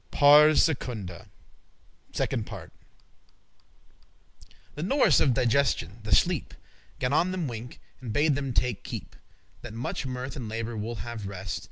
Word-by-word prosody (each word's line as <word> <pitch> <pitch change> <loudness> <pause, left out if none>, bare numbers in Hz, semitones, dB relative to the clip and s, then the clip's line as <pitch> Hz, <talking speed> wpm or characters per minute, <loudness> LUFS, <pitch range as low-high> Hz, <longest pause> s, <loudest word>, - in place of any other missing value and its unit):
*Pars 150 +2 +7
Secunda.* 110 - -3 0.8
*Second - - -2
Part* - - -9 2.0
The 150 - -6
norice* 205 - +4
of 130 -5 +3
digestion, 125 -6 +1
the 105 -1 +3
sleep, 175 -3 +1
*nurse - - -23 0.4
Gan 125 +1 -1
on 170 +4 +3
them 185 -4 -2
wink, 120 0 -7 0.2
and 120 -4 -6
bade 145 +6 +3
them 135 -1 -2
take 120 -2 0
keep,* - - -7
*heed - - -21 0.4
That 120 -2 -8
muche 125 +3 -3
mirth 130 +2 -5
and 125 -6 -5
labour 115 +1 -4
will 110 +2 -4
have 115 -4 -6
rest. 95 -1 -5
125 Hz, 150 wpm, -27 LUFS, 110-145 Hz, 2.0 s, Pars